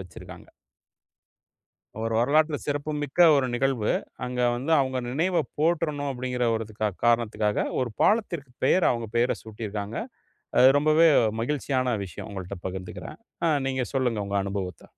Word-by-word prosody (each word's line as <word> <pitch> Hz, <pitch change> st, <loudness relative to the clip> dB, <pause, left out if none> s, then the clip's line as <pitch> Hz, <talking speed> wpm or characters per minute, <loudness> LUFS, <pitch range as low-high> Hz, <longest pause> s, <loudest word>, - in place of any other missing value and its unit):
வச்சிருக்காங்க. 90 Hz, -3 st, -11 dB, 1.5 s
ஒரு 115 Hz, 0 st, -2 dB
வரலாற்றில 150 Hz, +5 st, +3 dB
சிறப்பு 145 Hz, +1 st, -2 dB
மிக்க 145 Hz, +4 st, -3 dB, 0.2 s
ஒரு 135 Hz, -2 st, +2 dB
நிகழ்வு. 120 Hz, -3 st, +1 dB, 0.3 s
அங்க 125 Hz, 0 st, -3 dB, 0.2 s
வந்து 140 Hz, +7 st, -2 dB
அவங்க 130 Hz, -1 st, -1 dB
நினைவை 170 Hz, +7 st, +1 dB, 0.2 s
போற்றணும். 150 Hz, -3 st, 0 dB
அப்டின்கிற 125 Hz, -1 st, -2 dB
ஒரு 115 Hz, -, -3 dB
த 110 Hz, 0 st, -1 dB
காரணத்திற்காக 110 Hz, -3 st, +1 dB, 0.2 s
ஒரு 120 Hz, -3 st, -4 dB
பாலத்திற்கு 175 Hz, -, +1 dB
பெயர், 180 Hz, +7 st, +4 dB
அவங்க 115 Hz, -2 st, -2 dB
பெயர 120 Hz, +1 st, +2 dB
சூட்டியிருக்காங்க. 105 Hz, -1 st, -6 dB, 0.6 s
அது 130 Hz, -, +8 dB
ரொம்பவே 155 Hz, +3 st, +5 dB, 0.3 s
மகிழ்ச்சியான 130 Hz, -2 st, 0 dB
விஷயம். 90 Hz, -, -9 dB
உங்கள்ட்ட 95 Hz, 0 st, -6 dB
பகிர்ந்துக்கிறேன். 95 Hz, 0 st, -7 dB, 0.3 s
அ -, -, +3 dB, 0.2 s
நீங்க 130 Hz, -1 st, -1 dB
சொல்லுங்க, 120 Hz, -6 st, 0 dB
உங்க 100 Hz, 0 st, -4 dB
அனுபவத்த. 95 Hz, -2 st, -5 dB
125 Hz, 130 wpm, -26 LUFS, 110-145 Hz, 1.5 s, அது